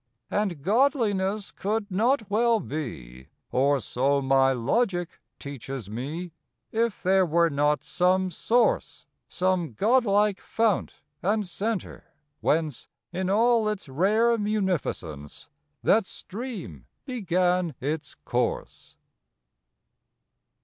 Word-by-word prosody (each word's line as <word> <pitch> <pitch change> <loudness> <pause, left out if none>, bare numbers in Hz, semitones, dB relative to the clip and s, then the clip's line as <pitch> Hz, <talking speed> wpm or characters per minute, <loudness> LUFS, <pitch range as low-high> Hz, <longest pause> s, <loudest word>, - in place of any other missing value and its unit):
And 190 -9 -1
Godliness 210 - +1
could 205 +1 -2
not 225 +4 +2
well 225 +2 +3
be 65 - -6 0.2
Or 140 +2 +3
so 135 +4 +1
my 135 0 +3
logic 175 - 0 0.2
teaches 135 -6 -7
me 150 +10 -5 0.4
If 230 -1 -1
there 190 +1 +4
were 170 -1 +2
not 145 +1 +1
some 185 +1 +1
source, 245 - +1 0.2
Some 180 -6 0
Godlike 210 - +3
fount 225 -3 -1 0.2
and 210 +3 +1
center 205 +2 -4 0.2
whence 155 -5 0 0.3
In 185 +1 -1
all 225 +1 +3
its 210 -6 -4
rare 210 - +3
munificence 180 - -3 0.3
That 215 -2 +4
stream 235 +3 -7 0.2
began 180 - 0
its 150 +3 -3
course. 120 -1 -3
185 Hz, 100 wpm, -26 LUFS, 145-215 Hz, 0.4 s, there